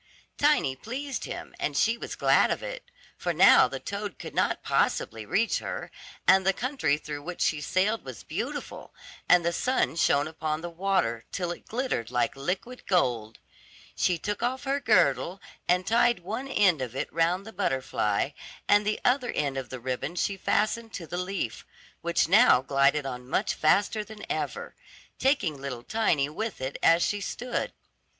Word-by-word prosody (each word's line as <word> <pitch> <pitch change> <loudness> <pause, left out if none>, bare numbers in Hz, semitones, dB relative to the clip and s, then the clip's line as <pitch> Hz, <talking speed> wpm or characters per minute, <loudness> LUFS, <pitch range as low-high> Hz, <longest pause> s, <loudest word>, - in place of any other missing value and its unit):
Tiny 290 - +3
pleased 265 - -5
him, - - -7
and - - -1
she 230 +1 +3
was 235 - -7
glad - - +4
of - - -2
it, - - -7 0.3
for - - -1
now - - +7
the - - -6
toad 200 -1 -5
could - - -8
not - - 0
possibly 110 -2 0
reach 225 - +1
her, - - -6 0.4
and 190 0 +6
the 195 +1 +3
country 245 - 0
through 150 -1 -6
which 175 +3 -7
she 155 -2 +1
sailed 195 +8 0
was - - -9
beautiful, - - -5 0.3
and 175 -1 +6
the 170 - +1
sun 255 -6 0
shone 145 -3 +2
upon 155 -1 -3
the 175 0 -6
water, 165 -11 0
till 175 -2 -2
it 175 - -9
glittered 240 - -2
like 125 +3 0
liquid 185 - -4
gold. 120 - +1 0.6
She 180 - +1
took 205 +6 -4
off 255 +3 -1
her 275 +1 0
girdle 205 -6 +2 0.3
and 180 +1 +2
tied 235 -2 +3
one 220 +9 -4
end 185 - +3
of 125 -1 -4
it - - -3
round 170 +4 +1
the 220 - -10
butterfly, 130 - 0 0.4
and 205 0 +4
the 215 - 0
other 250 0 +2
end 140 -2 -1
of 130 -2 -4
the 130 - -6
ribbon 130 +6 -3
she 195 +3 0
fastened 215 +3 0
to 175 - -6
the 175 - -5
leaf, 180 - -3 0.4
which 170 0 +1
now 200 - +6
glided 140 +1 +2
on 125 -1 -6
much - - +1
faster 205 +7 +2
than 210 0 -10
ever, 475 0 -3 0.5
taking 185 - +1
little 125 -4 -5
Tiny 170 - +1
with 215 +8 -4
it 130 +1 -4
as 165 +1 +5
she 205 -1 -1
stood. 245 +4 -3
180 Hz, 175 wpm, -27 LUFS, 140-220 Hz, 0.6 s, now